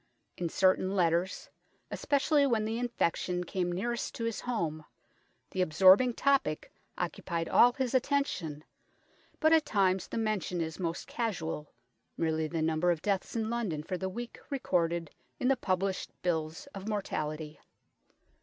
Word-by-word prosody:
In 175 Hz, -2 st, -2 dB
certain 185 Hz, +2 st, +2 dB
letters, 175 Hz, 0 st, +1 dB, 0.4 s
especially 285 Hz, 0 st, +2 dB
when 225 Hz, -4 st, +1 dB
the 225 Hz, +2 st, -2 dB
infection 180 Hz, -6 st, 0 dB
came 180 Hz, 0 st, -2 dB
nearest 235 Hz, +7 st, -2 dB
to 230 Hz, -, -4 dB
his 230 Hz, -1 st, -2 dB
home, 165 Hz, -11 st, -2 dB, 0.7 s
the 190 Hz, -, -1 dB
absorbing 190 Hz, +8 st, +6 dB
topic 275 Hz, -, +1 dB, 0.2 s
occupied 170 Hz, -1 st, -2 dB
all 245 Hz, 0 st, +6 dB
his 260 Hz, -2 st, -2 dB
attention, 250 Hz, -, 0 dB, 0.8 s
but 315 Hz, 0 st, +5 dB
at 320 Hz, -1 st, +6 dB
times 190 Hz, -3 st, +2 dB
the -, -, -5 dB
mention 215 Hz, -6 st, -1 dB
is 160 Hz, +1 st, -3 dB
most 170 Hz, -2 st, -2 dB
casual, 170 Hz, -10 st, -3 dB, 0.5 s
merely 160 Hz, -1 st, 0 dB
the 160 Hz, 0 st, -2 dB
number 160 Hz, +2 st, +2 dB
of 165 Hz, -2 st, 0 dB
deaths 200 Hz, +1 st, -1 dB
in 225 Hz, -1 st, -1 dB
London 200 Hz, -11 st, -2 dB
for 185 Hz, -, -3 dB
the 190 Hz, +1 st, -3 dB
week 240 Hz, +5 st, -7 dB
recorded 170 Hz, -, 0 dB, 0.3 s
in 250 Hz, -, +2 dB
the 270 Hz, -, +5 dB
published 190 Hz, -3 st, -1 dB
bills 160 Hz, -2 st, -1 dB
of 195 Hz, +2 st, -6 dB
mortality. 155 Hz, -7 st, -3 dB
185 Hz, 145 wpm, -31 LUFS, 165-230 Hz, 0.8 s, absorbing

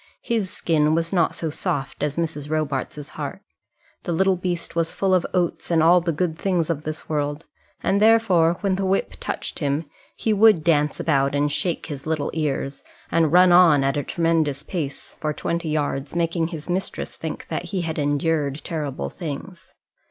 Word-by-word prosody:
His 220 Hz, -5 st, -1 dB
skin 155 Hz, -3 st, +1 dB
was 165 Hz, +2 st, -1 dB
not 170 Hz, -3 st, +2 dB
so 160 Hz, -2 st, -3 dB
soft 135 Hz, -2 st, -3 dB
as 150 Hz, 0 st, -1 dB
Mrs. 155 Hz, -3 st, -2 dB
Robarts's 150 Hz, -1 st, -2 dB
heart. -, -, -6 dB, 0.6 s
The -, -, -4 dB
little 190 Hz, +3 st, +3 dB
beast 175 Hz, -2 st, -3 dB
was 165 Hz, -1 st, 0 dB
full 195 Hz, -1 st, +1 dB
of 180 Hz, -2 st, +2 dB
oats 175 Hz, -2 st, -1 dB
and 165 Hz, -2 st, +3 dB
all 175 Hz, +2 st, +6 dB
the 170 Hz, 0 st, 0 dB
good 160 Hz, 0 st, -2 dB
things 175 Hz, -4 st, +1 dB
of 150 Hz, -3 st, -3 dB
this 155 Hz, 0 st, -4 dB
world, 145 Hz, 0 st, -2 dB, 0.4 s
and 200 Hz, +2 st, +2 dB
therefore, 195 Hz, -7 st, +4 dB
when 195 Hz, -2 st, +1 dB
the 195 Hz, -, -1 dB
whip 195 Hz, +1 st, +1 dB
touched -, -, -4 dB
him, 145 Hz, +1 st, 0 dB, 0.3 s
he 220 Hz, -, 0 dB
would 210 Hz, -5 st, +5 dB
dance 150 Hz, -3 st, +2 dB
about 140 Hz, -3 st, +1 dB
and 145 Hz, +1 st, +1 dB
shake 175 Hz, +3 st, -1 dB
his 145 Hz, -2 st, -7 dB
little 155 Hz, -2 st, -1 dB
ears, 140 Hz, -3 st, -2 dB, 0.3 s
and 165 Hz, -3 st, +3 dB
run 180 Hz, +1 st, +6 dB
on 170 Hz, -6 st, +6 dB
at 135 Hz, 0 st, +1 dB
a 145 Hz, -, 0 dB
tremendous 160 Hz, -3 st, 0 dB
pace 150 Hz, -6 st, -5 dB
for 155 Hz, -1 st, -1 dB
twenty 170 Hz, +1 st, -2 dB
yards, 145 Hz, -1 st, -2 dB
making 165 Hz, -1 st, +1 dB
his 160 Hz, -3 st, -7 dB
mistress 185 Hz, +2 st, -3 dB
think -, -, -6 dB
that -, -, -3 dB
he 190 Hz, -3 st, -2 dB
had 160 Hz, -2 st, -3 dB
endured 145 Hz, 0 st, 0 dB
terrible 150 Hz, -5 st, -4 dB
things. 170 Hz, +2 st, -7 dB
165 Hz, 180 wpm, -23 LUFS, 150-175 Hz, 0.6 s, all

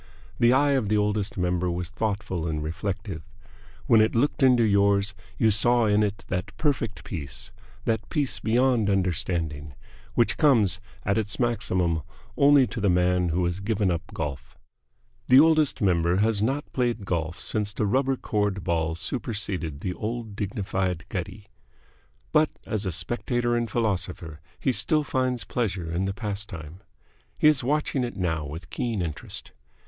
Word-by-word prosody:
The 120 Hz, 0 st, +5 dB
eye 140 Hz, +3 st, +4 dB
of 130 Hz, -7 st, +1 dB
the 105 Hz, -, +3 dB
Oldest 105 Hz, +1 st, -1 dB
Member 90 Hz, 0 st, 0 dB
was 85 Hz, 0 st, -3 dB
thoughtful 100 Hz, -5 st, -2 dB
and 75 Hz, -1 st, -2 dB
reflective. 95 Hz, +2 st, -4 dB, 0.6 s
When 115 Hz, -2 st, +6 dB
it 110 Hz, -, +2 dB
looked 140 Hz, +6 st, +1 dB
into 125 Hz, -3 st, +5 dB
yours 100 Hz, -1 st, +3 dB, 0.2 s
you 110 Hz, -, +4 dB
saw 120 Hz, +3 st, +4 dB
in 105 Hz, 0 st, +3 dB
it 105 Hz, -1 st, -2 dB
that 90 Hz, -1 st, -4 dB
perfect 135 Hz, -8 st, -1 dB
peace, 70 Hz, -, -5 dB, 0.3 s
that 110 Hz, -1 st, -1 dB
peace 145 Hz, -5 st, 0 dB
beyond 120 Hz, -2 st, +2 dB
understanding, 85 Hz, -6 st, -1 dB, 0.4 s
which 120 Hz, -, +2 dB
comes 110 Hz, -, +4 dB, 0.3 s
at 100 Hz, +2 st, +2 dB
its 105 Hz, -2 st, -2 dB
maximum 95 Hz, -9 st, +1 dB, 0.3 s
only 140 Hz, -1 st, +6 dB
to 115 Hz, -, -5 dB
the 100 Hz, -, +2 dB
man 90 Hz, 0 st, +2 dB
who 90 Hz, +2 st, +1 dB
has 90 Hz, +2 st, -2 dB
given 100 Hz, -2 st, 0 dB
up 85 Hz, -1 st, -1 dB
golf. 70 Hz, -6 st, -5 dB, 0.7 s
The 130 Hz, -, +8 dB
Oldest 155 Hz, -5 st, +4 dB
Member 85 Hz, -2 st, +2 dB
has 105 Hz, 0 st, +2 dB
not 135 Hz, +6 st, -1 dB
played 120 Hz, -5 st, 0 dB
golf 85 Hz, -2 st, -2 dB
since 105 Hz, -2 st, -2 dB
the 105 Hz, 0 st, -1 dB
rubber 135 Hz, +5 st, +2 dB
cored 105 Hz, -5 st, -1 dB
ball 80 Hz, -1 st, 0 dB
superseded 90 Hz, -, -3 dB
the 95 Hz, -, -2 dB
old 110 Hz, +1 st, -5 dB
dignified 95 Hz, -5 st, -2 dB
gutty. -, -, -5 dB, 0.9 s
But -, -, +4 dB, 0.2 s
as 105 Hz, -2 st, -2 dB
a -, -, 0 dB
spectator 120 Hz, +7 st, -1 dB
and 120 Hz, -1 st, -1 dB
philosopher 90 Hz, -7 st, -2 dB, 0.2 s
he 135 Hz, -, +1 dB
still 155 Hz, +4 st, +3 dB
finds 130 Hz, -3 st, -1 dB
pleasure 95 Hz, -8 st, -2 dB
in 90 Hz, +3 st, -1 dB
the 95 Hz, -, -1 dB
pastime. 100 Hz, -6 st, -5 dB, 0.6 s
He -, -, +4 dB
is 150 Hz, -4 st, +4 dB
watching 145 Hz, 0 st, 0 dB
it 120 Hz, -, -4 dB
now 80 Hz, -4 st, -1 dB
with 75 Hz, +2 st, -9 dB
keen 115 Hz, -6 st, -2 dB
interest. 80 Hz, -3 st, -7 dB
100 Hz, 155 wpm, -26 LUFS, 90-120 Hz, 0.9 s, The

